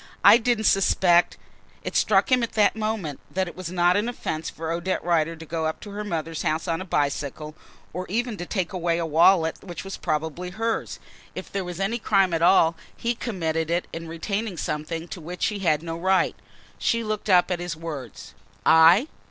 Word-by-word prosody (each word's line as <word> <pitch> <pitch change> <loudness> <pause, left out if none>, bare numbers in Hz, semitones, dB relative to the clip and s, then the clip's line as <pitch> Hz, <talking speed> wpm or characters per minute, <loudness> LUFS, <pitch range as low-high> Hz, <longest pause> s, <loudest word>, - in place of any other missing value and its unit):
"I - - +9
didn't 235 -2 0
suspect 180 -3 +3 0.2
" - - -31
It - - -5
struck - - +3
him 255 -1 +5
at 235 - -3
that 210 -1 +3
moment 215 -9 -3
that 190 0 -1
it - - -9
was 180 -2 -6
not 175 0 +3
an 210 +4 +1
offence 160 -9 -4
for 160 0 -5
Odette 175 +3 -2
Rider 165 -1 +1
to 165 0 -11
go 160 0 -2
up 160 - -4
to 205 - -9
her 210 +1 -5
mother's 165 -5 -3
house 155 +3 -1
on 165 0 -1
a - - -6
bicycle, 145 -1 -2 0.4
or 180 +2 -5
even 235 +3 -1
to 175 - -6
take 190 -2 -2
away 170 -2 0
a 170 - -1
wallet 165 +1 +3
which 175 -3 -7
was 195 0 -6
probably 160 +2 -3
hers. 225 +5 -2 0.4
If - - -7
there 195 - -2
was 180 0 -7
any 210 +5 -1
crime 195 -5 +2
at 165 - 0
all, 170 -1 +5 0.2
he 235 - -3
had 240 - -1
committed 165 -7 -2
it 175 +1 0
in 165 0 -6
retaining 195 +4 -3
something 160 +3 -4
to 180 - -7
which 175 +3 -3
he 210 -2 -2
had 155 -5 +1
no 165 -1 -4
right. 190 +1 +2 0.4
She 230 0 +1
looked 215 -1 -3
up 180 -1 +4
at 175 - -1
his 175 -1 -4
words. 145 - -8 0.3
"I? 165 - +6
175 Hz, 210 wpm, -24 LUFS, 165-200 Hz, 0.4 s, I